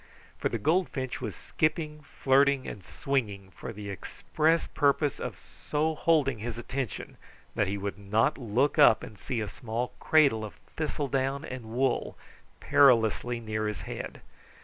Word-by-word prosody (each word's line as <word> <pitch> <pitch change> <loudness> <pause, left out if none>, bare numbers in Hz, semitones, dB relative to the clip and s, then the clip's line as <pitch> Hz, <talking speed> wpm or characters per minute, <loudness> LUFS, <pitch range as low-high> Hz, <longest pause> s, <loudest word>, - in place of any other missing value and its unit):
For - - 0
the - - -2
goldfinch 145 - 0
was - - -4
skipping, 155 -1 -1
flirting, 140 -1 +2
and 100 - -7
swinging 105 -9 -2
for - - -7
the 105 -2 -7
express 160 - 0
purpose 145 0 +1
of - - -5
so 155 +2 -2
holding 150 -7 +2
his 115 +1 -4
attention 130 -2 -5 0.4
that 105 - +1
he 100 +1 -2
would 100 0 -4
not 105 +8 +2
look 130 +3 0
up 110 - +7
and 105 - -10
see 120 -4 -2
a 105 - -2
small 120 +3 -3
cradle 140 -9 +4
of 105 - -7 0.2
thistledown 140 -2 -1
and 130 -5 -7
wool 120 +3 -1 0.4
perilously 120 -2 +4
near 110 -1 -2
his 105 -3 -4
head. - - -6
130 Hz, 150 wpm, -29 LUFS, 110-145 Hz, 0.4 s, up